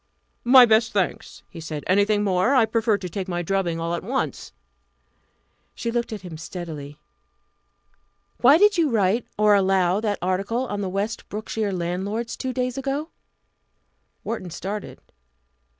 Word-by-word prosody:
"My 250 +1 +8
best 220 0 +3
thanks!" 195 -3 -2
he - - -11
said. 155 -2 -6
"Anything 205 +2 +2
more? 195 +7 +2
I 245 -4 +5
prefer 225 -1 +1
to 190 - -6
take 190 +2 -5
my 175 -1 -2
drubbing 175 -2 -1
all 165 +1 -2
at 170 - -2
once." - - -3 1.2
She 235 - -3
looked 235 0 -2
at 215 -3 -5
him 165 -4 -8
steadily. 155 -4 -7 1.4
"Why 275 +5 +6
did 410 0 +4
you 320 -3 +3
write, 220 0 +1
or 210 0 +5
allow 190 -1 +3
that 210 -2 -1
article 195 +7 -1
on 205 -4 -4
the 190 - -2
West 205 +4 -3
Brookshire 215 0 -3
landlords 190 +6 -3
two 260 - -3
days 255 0 -2
ago?" 280 +4 -3 1.1
Wharton 200 -6 -4
started. 195 +5 -6
205 Hz, 150 wpm, -23 LUFS, 180-230 Hz, 1.4 s, My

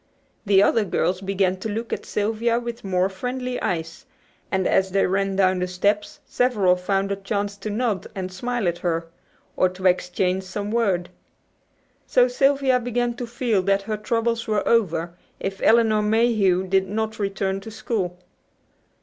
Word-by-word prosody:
The 195 -1 +6
other 225 +1 +3
girls 180 -1 0
began 190 -1 0
to 205 +4 -5
look 225 +3 -3
at - - -5
Sylvia 225 +3 0
with 235 0 -6
more 185 -1 +1
friendly 250 +5 -4
eyes, 165 -2 -3 0.4
and 190 -1 +1
as 190 0 +2
they 195 +1 +2
ran 195 +1 0
down 185 -1 +3
the 180 - -1
steps 205 +3 -1
several 210 -8 +2
found 195 +2 -1
a - - +1
chance 200 +1 -3
to 215 - -5
nod 215 -2 -1
and 185 -1 -4
smile 240 +2 -2
at 175 0 -1
her, 165 -1 -2 0.5
or 185 - +3
to 185 +1 -9
exchange 180 +1 +1
some 200 +2 -5
word. 195 -7 +1 1.0
So 250 0 +4
Sylvia 270 0 +2
began 245 0 -1
to 245 0 -6
feel 235 -4 0
that 195 +1 +1
her 215 +1 -2
troubles 230 +1 -1
were 215 -1 0
over, 170 -7 +1 0.3
if 195 0 -4
Elinor 225 -2 +4
Mayhew 210 -4 +2
did 190 0 +1
not 220 +1 -2
return 195 -1 -1
to 195 - -9
school. 210 -5 -3
200 Hz, 165 wpm, -23 LUFS, 185-230 Hz, 1.0 s, The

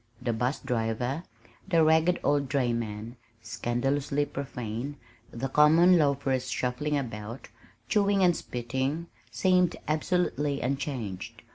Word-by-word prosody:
The 120 - -1
'bus 125 +5 0
driver, 120 +5 -1 0.5
the 165 -4 +4
ragged 160 +3 +4
old 145 -2 +1
dray 130 -4 +1
man 115 +1 -4 0.3
(scandalously 135 +6 -1
profane), 135 -1 -5 0.3
the 120 +3 -4
common 160 +6 +6
loafers 140 -3 +1
shuffling 140 +4 -1
about, 115 -2 -6 0.4
chewing 200 +4 +3
and 175 -2 +5
spitting, 130 +7 -3 0.2
seemed 180 -2 +2
absolutely 155 -2 0
unchanged. 130 -7 -4
135 Hz, 110 wpm, -28 LUFS, 120-155 Hz, 0.5 s, common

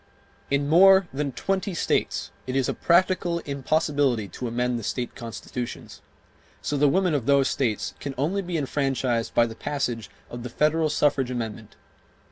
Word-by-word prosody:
In 140 0 +1
more 190 +4 +7
than 140 0 -2
twenty 195 +5 -2
states - - -1 0.2
it 130 - -3
is 135 -2 +2
a - - 0
practical 175 0 +2
impossibility 140 -5 0
to 125 - -5
amend 120 +1 -1
the - - -8
state 120 +3 -3
constitutions; 120 +1 -7 0.6
so 145 - -3
the 145 0 +4
women 180 +2 +2
of 135 -6 -1
those 140 -1 +4
States 115 -6 -1
can 140 -2 -5
only 170 +9 0
be 175 -2 -3
enfranchised 135 -5 -1
by 120 - +5
the 115 - -6
passage 120 -3 -3 0.2
of 120 - -6
the 125 - -6
federal 155 +5 +2
suffrage 140 -3 +1
amendment. 115 -3 -5
140 Hz, 160 wpm, -25 LUFS, 120-155 Hz, 0.6 s, more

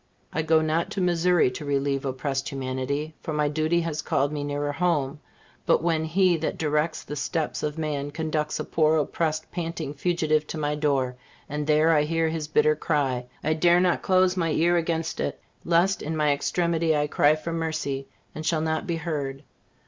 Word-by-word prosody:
I 160 - 0
go 160 0 +3
not 155 +2 0
to - - -3
Missouri 175 -5 +3
to 125 - -7
relieve 140 -1 0
oppressed 135 +1 -2
humanity, 135 +3 -3
for 160 - -4
my 150 0 +1
duty 155 +3 +1
has 160 -2 -3
called 140 +1 0
me 150 -1 -3
nearer 145 0 -2
home; 150 -3 0 0.5
but - - +3
when 160 -2 +1
He 180 +1 +3
that 160 - -3
directs 155 +1 0
the 150 - -6
steps 155 +2 -2
of 150 +1 -3
man 145 -3 -2
conducts 155 0 -2
a - - -1
poor, 155 0 +2
oppressed, 155 +1 -1
panting 165 -4 -4
fugitive 155 -1 0
to - - -5
my 150 -1 -1
door, 140 -4 0 0.3
and 150 0 -3
there 155 +1 +4
I 150 - +4
hear 165 +2 +1
his 160 -2 -3
bitter 155 0 +3
cry, 135 -6 -1 0.2
I 155 - +2
dare 175 +2 +4
not 180 -1 +2
close 185 -1 +3
my 170 -3 0
ear 170 +3 +3
against 165 -1 -1
it, - - -2 0.3
lest 175 +3 +2
in 160 +2 -3
my 150 -1 +3
extremity 165 +1 +1
I 145 - +2
cry 150 0 +3
for 165 +2 -5
mercy, 155 -4 -2 0.3
and 155 - -6
shall 160 0 +1
not 160 +4 -1
be 170 - 0
heard. 145 -4 -4
155 Hz, 190 wpm, -25 LUFS, 145-165 Hz, 0.5 s, there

